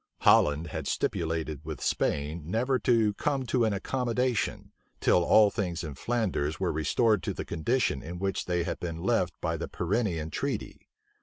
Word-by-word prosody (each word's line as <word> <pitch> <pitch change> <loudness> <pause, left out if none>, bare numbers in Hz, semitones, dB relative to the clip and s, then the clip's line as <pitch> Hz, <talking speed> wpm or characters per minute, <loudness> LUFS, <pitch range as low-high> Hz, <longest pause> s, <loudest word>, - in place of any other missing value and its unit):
Holland 75 +3 +5
had 80 -3 -4
stipulated 80 -3 -2
with 80 -1 -6
Spain 75 +2 -1
never 125 +6 +1
to 115 -4 +3
come 135 +4 -1
to 120 -1 +2
an 110 - +1
accommodation, 125 +3 -1 0.3
till 90 - +4
all 105 +3 +6
things 90 -5 -2
in 75 -3 -5
Flanders 90 - -1
were - - 0
restored 100 - +2
to - - -3
the - - -4
condition 85 - 0
in 85 +2 -7
which 95 0 -2
they 90 -1 0
had 85 - -3
been 85 -1 -5
left - - +1
by - - -1
the - - -4
Pyrenean 85 -4 -1
treaty. - - -4
90 Hz, 165 wpm, -28 LUFS, 80-115 Hz, 0.3 s, all